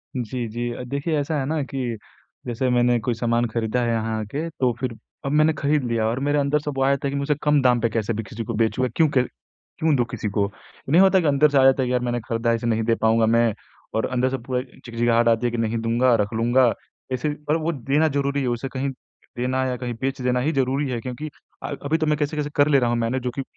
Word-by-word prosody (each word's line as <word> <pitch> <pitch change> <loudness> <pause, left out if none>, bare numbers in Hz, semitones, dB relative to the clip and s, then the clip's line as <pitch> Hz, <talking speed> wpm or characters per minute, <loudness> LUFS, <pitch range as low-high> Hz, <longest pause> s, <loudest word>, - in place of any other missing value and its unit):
जी, 120 0 -3
जी 120 +2 -3
अ, 125 - -6
देखिए, 140 +5 -2
ऐसा 145 +1 -1
है 135 - -1
ना, 155 +2 -1
कि 130 -4 -4 0.5
जैसे 125 +2 -1
मैंने 120 -1 +3
कोई 120 +3 -1
सामान 115 +1 +1
खरीदा 115 +2 -1
है 120 - +1
यहाँ 110 0 -1
आके, 140 +10 -4
तो 130 -6 0
फिर 130 -2 -2 0.3
अब 140 - -1
मैंने 155 +1 +4
खरीद 145 -1 0
लिया 115 -2 +1
और 115 +3 -1
मेरे 145 +2 +1
अंदर 145 +1 +2
से 150 0 -4
वो 135 - -1
आ 135 - +3
जाता 140 0 0
है - - -2
कि 140 - -3
मैं 140 - -1
उसे 150 +1 +1
कम 150 -1 +4
दाम 125 -2 +4
पे 115 - +2
कैसे 110 0 -1
भी 110 +1 -3
किसी 115 +1 -6
को 115 - -4
बेंचू 115 +3 +1
या 125 - +1
क्यों 160 - +4
क 125 -1 +3 0.5
क्यों 160 -1 +3
दूँ 120 - +2
किसी 105 - -3
को? 100 0 0 0.4
नहीं 160 +6 +5
होता 190 0 +5
कि 165 - -1
अंदर 145 +1 +4
से 140 - +3
आ 135 - +5
जाता 135 0 +5
है - - 0
कि, - - -1
"यार, 125 - +2
मैंने 120 0 -1
खरीदा 115 0 -1
है, 115 - +3
इसे 115 - -5
नहीं 115 -1 +1
दे 115 - +3
पाऊँगा 110 0 +4
मैं।" 115 -1 +3 0.4
और 110 - +1
अंदर 125 0 +1
से 135 - -1
पूरा 125 +1 -2
झिगझिगाहट 120 -2 0
आती 115 +1 +2
है - - +1
कि, 120 - -3
"नहीं 115 0 0
दूँगा, 120 +2 +3
रख 100 0 -1
लूँगा।" 120 +2 +3 0.4
ऐसे 130 +4 -1
र 145 - -1
पर 155 - +3
वो 165 +1 -1
देना 145 +3 +1
ज़रूरी 140 -1 0
हो, 125 - +1
उसे 125 +3 -5
कहीं 135 +1 -2 0.5
देना 130 +1 0
या 125 -1 -1
कहीं 120 -1 -4
बेच 135 0 -2
देना 125 0 +1
ही 155 +5 0
ज़रूरी 135 +1 0
है, 120 - -2
क्योंकि 130 +6 -5 0.3
अ, - - -4
अभी 150 +3 0
तो 155 - 0
मैं 150 -1 +1
कैसे-कैसे 150 0 -2
कर 145 +1 +4
ले 140 - +5
रहा 120 -2 +1
हूँ 120 - +1
मैनेज, 120 +3 -1
जो 125 - -1
कि - - 0
125 Hz, 275 wpm, -23 LUFS, 115-140 Hz, 0.5 s, नहीं